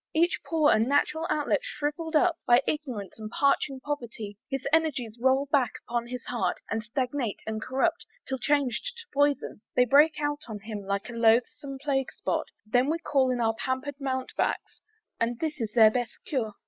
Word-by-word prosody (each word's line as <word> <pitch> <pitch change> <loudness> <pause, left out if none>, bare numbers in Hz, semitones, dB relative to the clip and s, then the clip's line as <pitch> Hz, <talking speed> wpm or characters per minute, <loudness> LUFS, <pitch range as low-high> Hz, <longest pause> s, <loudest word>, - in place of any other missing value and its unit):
Each 340 +3 +3
pore 315 -3 +3
and 220 +2 +2
natural 300 +3 +1
outlet 300 +6 +1
shrivell'd 320 -7 -3
up 340 +2 +3
By 245 +2 +6
ignorance 250 -11 -4
and 215 -1 -6
parching 275 +1 +1
poverty, 235 -7 -5
His 270 -1 -3
energies 255 -8 +1
roll 265 +2 +3
back 260 -6 +3
upon 235 0 -1
his 250 +1 -6
heart, 240 -2 -1
And 225 +1 0
stagnate 250 0 -2
and 220 0 -3
corrupt; 335 +8 0 0.2
till 265 -1 -2
changed 285 - 0
to 470 - -7
poison, 285 -6 +1
They 250 - +5
break 295 +5 +6
out 290 0 -1
on 215 -3 -6
him, 215 -1 -6
like 200 0 -1
a - - -8
loathsome 235 +4 +2
plague 270 -1 -1
spot; - - -2 0.2
Then 245 +5 +2
we 325 - +1
call 275 -5 +1
in 250 -1 0
our 225 -1 +2
pamper'd 260 +4 -3
mountebanks 260 -1 -2 0.4
And 235 +1 0
this 305 -4 -3
is 220 -2 -2
their 220 -2 +8
best 245 0 -2
cure! 225 -7 -2
265 Hz, 180 wpm, -28 LUFS, 230-295 Hz, 0.4 s, their